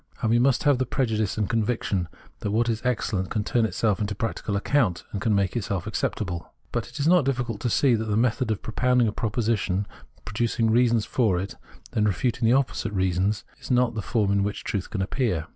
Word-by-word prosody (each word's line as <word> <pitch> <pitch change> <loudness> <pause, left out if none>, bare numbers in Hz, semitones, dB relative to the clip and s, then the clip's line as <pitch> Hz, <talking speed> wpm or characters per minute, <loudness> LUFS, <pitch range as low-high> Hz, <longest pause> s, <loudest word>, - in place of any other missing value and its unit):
And 110 - +2
we 120 - +4
must 130 +1 +3
have 145 -3 +4
the 130 - 0
prejudice 110 -7 0
and 105 -2 0
conviction 110 -5 0 0.3
that 105 - -3
what 115 +3 +1
is 115 0 -1
excellent 105 -6 -1
can 105 - -1
turn 115 +1 +1
itself 105 +1 0
to 105 0 -3
practical 110 -1 -3
account, 105 - +1
and 100 - -4
make 100 0 +1
itself 100 -5 -2
acceptable. 95 -4 -3 0.2
But - - -2
it 140 +6 -9
is 140 - +1
not 175 -2 +5
difficult 125 -5 -2
to 120 - 0
see 130 +3 +3
that 110 -1 0
the 105 -1 0
method 120 +1 +1
of 110 -2 -2
propound 125 +2 +2
ing - - +2
a - - 0
proposition, 105 -4 0 0.4
producing 115 +1 0
reasons 115 -2 +3
for 110 -8 +1
it 95 +2 -4
and - - -21 0.5
then - - +3
refuting 115 +3 +1
its 120 - +5
opposite 120 -5 -2
by - - -2
reasons 95 +2 +1 0.2
too, - - -27
is - - -10
not 125 -2 +3
the 110 - -3
form 105 -2 0
in 100 0 +2
which 105 +1 -2
truth 100 -3 -3
can 95 -3 -2
appear. 100 - -1
110 Hz, 225 wpm, -25 LUFS, 100-120 Hz, 0.5 s, not